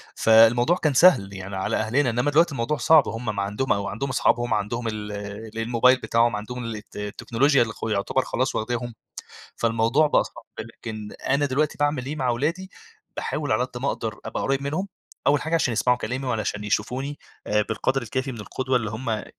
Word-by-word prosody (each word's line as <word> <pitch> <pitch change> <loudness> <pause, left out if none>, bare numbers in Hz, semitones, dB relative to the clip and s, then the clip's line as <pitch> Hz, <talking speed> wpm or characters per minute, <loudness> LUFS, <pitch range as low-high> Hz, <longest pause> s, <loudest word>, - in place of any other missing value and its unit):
فالموضوع 115 +7 +5
كان 155 -5 +1
سهل 130 - +5
يعني 95 0 -7
على 95 - -1
أهلنا، 120 +5 +1
إنما 125 +5 0
دلوقتي 165 +3 +4
الموضوع 135 +3 -1
صعب، 150 +3 +5
هُم 115 -2 -3
ما 100 - -1
عندهم 105 +6 0
أو 100 -1 -2
عندهم 135 +7 -3
أصحابهم، 120 -1 +1
عندهم 115 +3 -2
ال 105 -1 -4
ال 105 +2 -7
الموبايل 120 +3 +4
بتاعهم، 115 -1 +2
عندهم 120 +4 -5
ال 115 -1 -4
الت 105 0 -12
التكنولوجيا 115 +7 +1
اللي 115 -1 0
خ - - -17
يُعتبر 100 -2 0
خلاص - - -1
واخداهُم، 120 +1 -2 0.6
فالموضوع 115 +6 +2
بقى 150 - +3
صعب. - - -11 0.2
لكن 110 -2 -7 0.2
أنا 145 +1 +2
دلوقتي 145 +3 0
بأعمل 145 -3 0
إيه 150 +3 -4
مع 130 -4 -1
أولادي، 160 +10 -1 0.5
باحاول 150 -4 -2
على 115 +3 +2
قد 125 -1 -8
ما 140 - +1
أقدر 110 -4 -3
أبقى - - -4
قريِّب 135 0 0
منهم، 155 +8 -2 0.4
أول 145 0 +3
حاجة 160 +2 -2
عشان 145 -7 +2
يسمعوا 125 +2 +2
كلامي 130 +3 -4
وعلشان 105 -3 -2
يشوفوني 125 +8 -2 0.3
آآ 105 0 +2
بالقدْر 130 +4 0
الكافي 130 +4 -3
من 115 - -8
القدوة 130 +4 -2
اللي 110 -4 -1
هُم 110 -1 -3
120 Hz, 190 wpm, -24 LUFS, 110-135 Hz, 0.6 s, فالموضوع